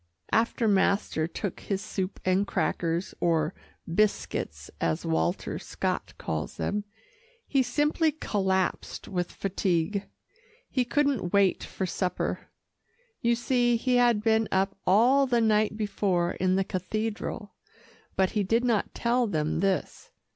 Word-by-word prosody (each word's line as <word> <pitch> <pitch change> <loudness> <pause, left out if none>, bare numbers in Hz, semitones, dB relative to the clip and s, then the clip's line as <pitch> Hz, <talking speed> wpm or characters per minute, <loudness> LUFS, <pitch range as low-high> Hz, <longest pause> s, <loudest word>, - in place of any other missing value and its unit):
After 230 +1 +2
master 195 -5 +2
took 180 +2 -4
his 195 -2 -2
soup 190 0 -4
and 185 +2 +2
crackers, 170 -1 -1
or 160 -2 +1 0.3
"biscuits," 205 +5 -1
as 80 -1 0
Walter 80 0 -1
Scott - - -3
calls 80 0 -4
them, 205 0 -2 0.6
he 275 - +3
simply 295 +5 +2
collapsed 190 - -1
with 180 -2 -2
fatigue. 195 0 -1 0.6
He 255 -2 +1
couldn't 270 -9 0
wait 200 -2 +3
for 190 - -4
supper. 180 0 -2 0.7
You 235 -1 +3
see 240 0 +2
he 250 +2 +2
had 240 -4 +3
been 220 -1 +3
up 195 +1 +1
all 250 +9 +5
the 240 -2 +2
night 215 -1 +2
before 190 -5 0
in 185 0 +1
the 195 - +2
cathedral, 210 +2 -3 0.6
but 190 -1 +2
he 210 - 0
did 225 +5 +2
not 230 -4 0
tell 240 0 +1
them 155 -6 -1
this. 195 -1 -1
200 Hz, 130 wpm, -28 LUFS, 185-235 Hz, 0.7 s, all